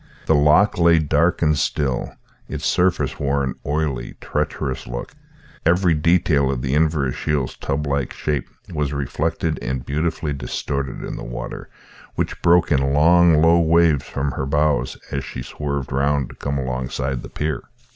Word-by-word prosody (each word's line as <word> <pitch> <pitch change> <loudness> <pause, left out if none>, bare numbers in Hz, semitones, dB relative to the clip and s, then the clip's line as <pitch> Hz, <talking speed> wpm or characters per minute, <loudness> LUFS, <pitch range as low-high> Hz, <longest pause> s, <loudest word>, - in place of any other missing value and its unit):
The - - +3
loch 75 +7 +4
lay 85 0 +6
dark 80 +3 +2
and 75 -1 +3
still, 70 -3 -1 0.4
its - - -5
surface 75 -8 +1
wore 70 0 +1
an 65 - -2
oily, 75 -3 -2
treacherous 65 0 -3
look; - - -6 0.5
every 90 +1 +3
detail 75 -3 +2
of 65 -2 -2
the 65 0 -1
Inverashiel's 75 -3 0
tub 70 +2 -2
like 70 -2 -1
shape 75 -2 -2 0.2
was 75 -2 -1
reflected 70 -3 -2
and 65 0 -3
beautifully 75 +1 -1
distorted 70 +1 -4
in - - -5
the - - -7
water, - - -6 0.5
which - - -2
broke 85 0 +4
in 70 -1 +2
long 80 +1 +5
low 85 +1 +6
waves 85 -3 +3
from 70 +1 -2
her 65 - -3
bows 75 +1 +1
as 70 -1 -2
she 60 - -6
swerved 70 -1 -4
round 70 0 +1
to - - -12
come 70 0 -3
alongside 65 0 -3
the - - -9
pier. 75 -1 -2
70 Hz, 155 wpm, -21 LUFS, 70-80 Hz, 0.5 s, lay